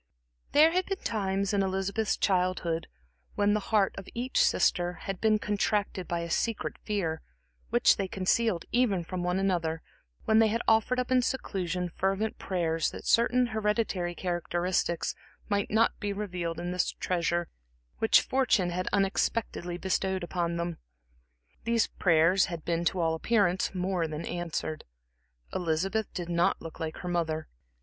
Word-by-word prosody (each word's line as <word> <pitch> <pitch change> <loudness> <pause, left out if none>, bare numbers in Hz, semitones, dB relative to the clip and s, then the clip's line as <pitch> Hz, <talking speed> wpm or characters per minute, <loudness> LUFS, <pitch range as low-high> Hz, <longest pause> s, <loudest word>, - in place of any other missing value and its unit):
There 310 +3 +7
had 365 +2 0
been 390 - -1
times 195 -2 -1
in 200 - +3
Elizabeth's 195 +2 0
childhood 180 -3 0 0.5
when 205 0 +3
the 210 - +2
heart 210 -3 +3
of 195 - -10
each 250 +2 +1
sister 175 -1 +2
had 195 -2 -4
been 220 -1 +4
contracted 205 -2 -1
by 170 -1 -1
a 170 - -5
secret 225 +5 -1
fear, 175 -7 -2 0.5
which - - +4
they 195 - -1
concealed 190 0 +1
even 225 -8 +2
from 180 +2 -4
one 180 +1 0
another, 170 -4 0 0.4
when 220 0 +4
they 225 - +6
had 230 +2 -1
offered 225 +3 +3
up 250 0 -2
in 255 -1 +5
seclusion 185 -8 -2
fervent 195 +5 -1
prayers 165 -3 0
that - - -9
certain 245 +2 +4
hereditary 210 -5 0
characteristics 175 -1 -1 0.4
might 200 -1 0
not 225 +2 +3
be 205 -1 -2
revived 180 -5 -3
in 175 0 -3
this 180 0 0
treasure 175 -1 -1 0.5
which 225 - +5
fortune 245 -9 +2
had 180 +1 -2
unexpectedly 195 -2 0
bestowed 190 0 -1
upon 170 -1 -2
them. 170 -1 -3 0.8
These 230 -1 +2
prayers 170 +2 +3
had 170 -3 -6
been 170 0 0
to 185 - +1
all 165 -1 +2
appearance 190 +1 +1
more 180 -2 0
than 155 +1 -5
answered. 170 -2 -3 0.7
Elizabeth 185 +6 -1
did 175 -2 -5
not 175 +2 +2
look 165 -1 -9
like 160 -1 -4
her 180 - -7
mother. 160 -3 -1
185 Hz, 155 wpm, -29 LUFS, 175-210 Hz, 0.8 s, There